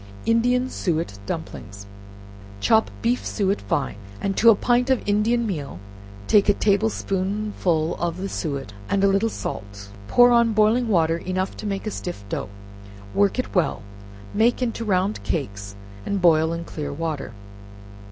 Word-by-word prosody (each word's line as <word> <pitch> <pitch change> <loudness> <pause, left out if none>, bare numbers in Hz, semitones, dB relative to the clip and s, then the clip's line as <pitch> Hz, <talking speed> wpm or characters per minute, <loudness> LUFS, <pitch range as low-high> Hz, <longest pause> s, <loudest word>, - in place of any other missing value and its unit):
Indian 245 +3 +2
Suet 165 - -2
Dumplings 100 +1 -6 0.7
Chop 220 - +3
beef 240 +2 +1
suet 200 -1 -1
fine, 135 -8 -2 0.2
and 195 -1 -1
to 230 - +6
a 225 - +7
pint 245 +4 +1
of 260 -5 +1
Indian 220 +3 +2
meal, 150 - -4 0.5
take 205 - +4
a 205 - +5
table 210 +2 +2
spoonful 190 -5 -1
of 170 0 -2
the 190 +1 -3
suet 140 - -4 0.2
and 200 0 +1
a - - +6
little 195 +3 +2
salt; 100 - -6 0.2
pour 245 - +6
on 235 -1 +4
boiling 215 +3 +3
water 165 -5 +2
enough 185 +2 -3
to 215 - -5
make 195 0 -3
a 215 - -2
stiff 175 - -6
dough, - - -3 0.6
work 200 +2 +2
it 255 - -3
well, 175 - +1 0.5
make 225 +3 +3
into 230 -2 -2
round 195 -1 0
cakes, 105 -9 -4 0.3
and 200 - -1
boil 160 -2 +4
in 170 0 -3
clear 150 -3 -5
water. 150 -6 -4
195 Hz, 155 wpm, -23 LUFS, 160-220 Hz, 0.7 s, a